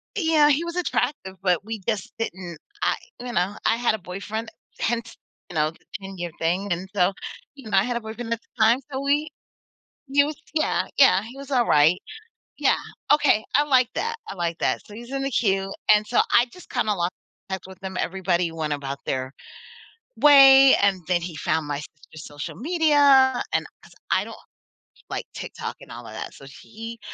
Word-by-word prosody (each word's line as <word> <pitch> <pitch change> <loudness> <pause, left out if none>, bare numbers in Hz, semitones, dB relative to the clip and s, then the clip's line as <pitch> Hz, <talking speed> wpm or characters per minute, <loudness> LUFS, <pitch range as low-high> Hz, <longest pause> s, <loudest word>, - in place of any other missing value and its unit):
Yeah, 320 -6 +4
he 295 +3 +2
was 340 0 -5
attractive, 290 - -1
but 180 0 +1
we 225 0 -5
just 215 -5 -2
didn't 180 -7 -5 0.2
I - - +2 0.2
you 245 0 -6
know, 195 -1 0
I 225 - +3
had 240 -2 +1
a - - -5
boyfriend, 205 +4 -6 0.3
hence, 230 0 -2 0.3
you 175 - -10
know, 155 0 +2
the 165 - -23 0.2
10 195 -1 -8
year 175 0 -4
thing. 180 +4 -1
And 180 +2 -2
so, 180 0 +3 0.4
you 270 -6 -11
know, 200 - +2
I 190 - +5
had 245 +1 -2
a 235 - -5
boyfriend 225 +1 -7
at 230 - -4
the 230 -1 -2
time. 230 +3 +5
So, 265 0 -3
we 295 +2 +1 0.8
use 285 +2 +1
Yeah, 310 - +1
yeah, 270 -8 +6
he 245 +4 -11
was 280 0 -10
all 245 -3 +3
right. 155 +5 +4 0.6
Yeah, - - +3 0.4
okay. 290 -7 +3
I 290 - +5
like 260 -4 +3
that, 460 0 -2
I - - -5
like 170 -3 -2
that, - - 0
so 210 - -11
he's 240 +2 -10
in 275 0 -2
the 275 - -1
queue 195 -4 +1 0.2
and 210 0 +2
so, 235 - +3
I 240 +1 +5
just 360 - -15
kinda 230 -4 0
lost 175 0 -1 0.4
touch 190 0 -4
with 190 +1 -14
him, 190 -1 -5
everybody 180 -2 0
went 155 -2 -2
about 140 -1 -4
their 130 0 -3 0.8
way, 275 -2 +8
and 200 -2 +2
then 180 -1 +1
he 170 -1 -6
found 160 -3 0
my 145 -1 -2
sister's 155 +1 -12
social 145 0 -7
media, 285 -4 +4
and - - +1 0.2
'cause - - -18 0.2
I - - +2
don't - - -9 0.7
like - - -4
TikTok - - -6
and - - -14
all - - -9
of - - -10
that. - - -7
So, - - -13 0.2
he, 225 +1 -9
220 Hz, 195 wpm, -24 LUFS, 180-270 Hz, 0.8 s, way